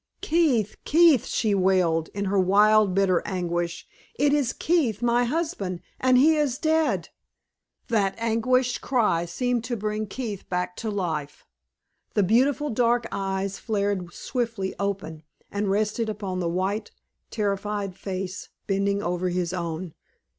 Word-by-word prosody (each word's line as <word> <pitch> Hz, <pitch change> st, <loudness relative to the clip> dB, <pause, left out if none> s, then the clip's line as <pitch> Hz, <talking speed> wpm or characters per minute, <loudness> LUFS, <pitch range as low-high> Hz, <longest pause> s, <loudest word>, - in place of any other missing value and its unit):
"Keith! 280 Hz, -, +1 dB
Keith!" 320 Hz, -5 st, +5 dB
she 215 Hz, -3 st, 0 dB
wailed, 180 Hz, -4 st, +2 dB
in 200 Hz, 0 st, -2 dB
her 195 Hz, 0 st, +1 dB
wild, 205 Hz, +1 st, +4 dB
bitter 195 Hz, -2 st, +3 dB
anguish. 175 Hz, -2 st, -3 dB, 0.3 s
"It 290 Hz, 0 st, +3 dB
is 280 Hz, -5 st, +2 dB
Keith, 255 Hz, -, 0 dB
my 240 Hz, +1 st, +3 dB
husband, 235 Hz, -, -2 dB, 0.2 s
and 255 Hz, -1 st, +4 dB
he 310 Hz, +4 st, +5 dB
is 285 Hz, -4 st, +1 dB
dead!" 310 Hz, -, +1 dB, 0.8 s
That 200 Hz, -5 st, +1 dB
agonized 235 Hz, +3 st, +1 dB
cry 210 Hz, -10 st, +1 dB
seemed 245 Hz, +7 st, -1 dB
to 240 Hz, -2 st, -2 dB
bring 215 Hz, +1 st, -2 dB
Keith 210 Hz, -3 st, -6 dB
back 180 Hz, 0 st, -2 dB
to 225 Hz, -, -3 dB
life. 160 Hz, -8 st, -3 dB, 0.7 s
The 205 Hz, -, +4 dB
beautiful 265 Hz, +8 st, +2 dB
dark 235 Hz, 0 st, +2 dB
eyes 195 Hz, 0 st, -2 dB
flared 200 Hz, -5 st, -1 dB
swiftly 230 Hz, -4 st, -3 dB
open, 195 Hz, -6 st, -3 dB, 0.3 s
and 205 Hz, 0 st, -1 dB
rested 215 Hz, +3 st, 0 dB
upon 195 Hz, -3 st, -4 dB
the 170 Hz, -2 st, -1 dB
white, 190 Hz, +5 st, -1 dB, 0.4 s
terrified 205 Hz, -2 st, -2 dB
face 190 Hz, 0 st, -5 dB, 0.2 s
bending 200 Hz, 0 st, 0 dB
over 180 Hz, +1 st, -1 dB
his 175 Hz, 0 st, -1 dB
own. 170 Hz, -1 st, -4 dB
205 Hz, 135 wpm, -25 LUFS, 185-240 Hz, 0.8 s, Keith